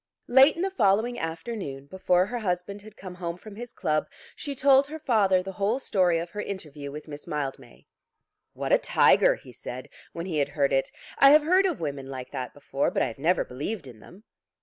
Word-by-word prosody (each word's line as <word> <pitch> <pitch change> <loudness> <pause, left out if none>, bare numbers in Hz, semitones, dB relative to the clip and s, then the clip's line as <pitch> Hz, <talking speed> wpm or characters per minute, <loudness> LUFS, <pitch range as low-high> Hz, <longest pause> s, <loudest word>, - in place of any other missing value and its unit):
Late 265 +4 +6
in 340 - -2
the 385 - -1
following 225 - +2
afternoon, 165 - -5
before 180 +3 +1
her 245 +4 -4
husband 200 0 -3
had 215 +1 -14
come 185 -2 -8
home 175 -1 -5
from 205 +2 -12
his 240 +2 -8
club, 155 -1 -1 0.3
she 285 -2 -5
told 275 0 +5
her 310 +2 -6
father 205 -11 +2
the 195 - -6
whole 205 +5 0
story 185 -9 +2
of 170 +1 -5
her 210 - -4
interview 150 -8 -7
with 150 +2 -9
Miss 145 -1 -9
Mildmay. 135 -5 -5 0.7
"What - - -4
a - - +6
tiger," - - +4
he - - -15
said, 130 +1 -8 0.2
when 170 0 -6
he 165 -5 -2
had 140 0 +1
heard 140 -2 0
it. 135 0 +1 0.3
"I 275 - +8
have 300 +1 +7
heard 370 +5 +4
of 345 - -3
women 140 -4 -4
like 130 -2 -7
that 130 -3 -5
before, 140 -1 -1
but - - 0
I - - +1
have 115 - -11
never 170 +5 +2
believed 150 - -5
in 120 -4 -12
them." 190 - -16
185 Hz, 215 wpm, -26 LUFS, 145-230 Hz, 0.7 s, I